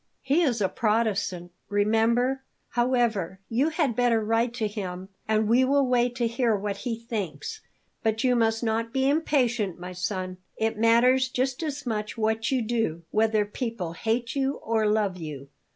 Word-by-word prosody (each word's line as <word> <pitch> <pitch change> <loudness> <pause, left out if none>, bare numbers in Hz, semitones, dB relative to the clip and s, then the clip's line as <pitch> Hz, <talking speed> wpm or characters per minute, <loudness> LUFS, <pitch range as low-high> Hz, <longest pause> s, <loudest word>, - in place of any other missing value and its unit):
"He 280 +5 +3
is 245 -9 +1
a 195 - +3
Protestant, 200 -5 0 0.2
remember. 225 +5 +2 0.3
However, 235 -7 0
you 260 +7 +2
had 305 -7 0
better 240 -1 +3
write 225 +2 +2
to 225 -3 0
him, 190 -3 -6 0.2
and 215 0 +2
we 240 +4 +4
will 275 +1 +3
wait 245 -1 +2
to 240 -2 0
hear 230 -1 +1
what 200 0 -3
he 230 +2 -4
thinks. 230 - -5 0.4
But 220 +1 0
you 250 -1 +3
must 225 0 +1
not 230 0 0
be 265 0 +2
impatient, 250 - +1
my 180 +1 -7
son; 185 0 -3 0.2
it 220 0 0
matters 240 +4 +4
just 255 +1 -1
as 290 -3 -4
much 215 -2 -3
what 220 0 0
you 255 -3 +1
do, 220 -8 -1
whether 215 -1 +2
people 205 -5 -4
hate 230 +6 -1
you 270 0 +1
or 220 -1 +1
love 210 -3 +1
you." 145 -5 -7
225 Hz, 170 wpm, -26 LUFS, 210-250 Hz, 0.4 s, we